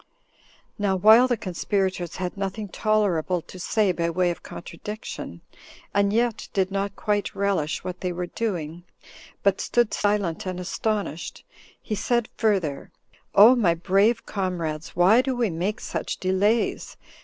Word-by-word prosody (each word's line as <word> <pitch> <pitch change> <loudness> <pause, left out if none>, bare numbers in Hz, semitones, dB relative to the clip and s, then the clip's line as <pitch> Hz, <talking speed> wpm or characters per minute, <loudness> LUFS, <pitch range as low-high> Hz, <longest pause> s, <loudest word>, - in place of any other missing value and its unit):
Now 200 -2 +1
while 220 +6 +7
the 245 -2 0
conspirators 185 -1 -2
had 180 -1 -4
nothing 200 +1 -4
tolerable 190 -5 +1
to 185 - -12
say 205 +2 +1
by 170 -1 -1
way 175 +1 +1
of 170 - -7
contradiction, 210 +6 -8 0.5
and 200 0 +2
yet 230 0 0
did 190 -2 +1
not 195 0 -2
quite 205 -1 -1
relish 195 -7 -1
what 180 0 -6
they 180 - -1
were 180 0 -3
doing, 175 -5 -4 0.6
but 200 -1 +2
stood 240 -2 +1
silent 205 -4 0
and 185 -1 -3
astonished, 195 -2 -3 0.3
he - - -5
said 235 +2 0
further, 185 -11 0 0.5
"O 220 +6 +9
my 185 -9 +3
brave 195 +7 +2
comrades! 170 -5 -3
why 190 +7 +6
do 260 0 -2
we 235 -5 0
make 180 +6 -2
such - - -4
delays? 200 +5 0
195 Hz, 145 wpm, -25 LUFS, 175-215 Hz, 0.6 s, O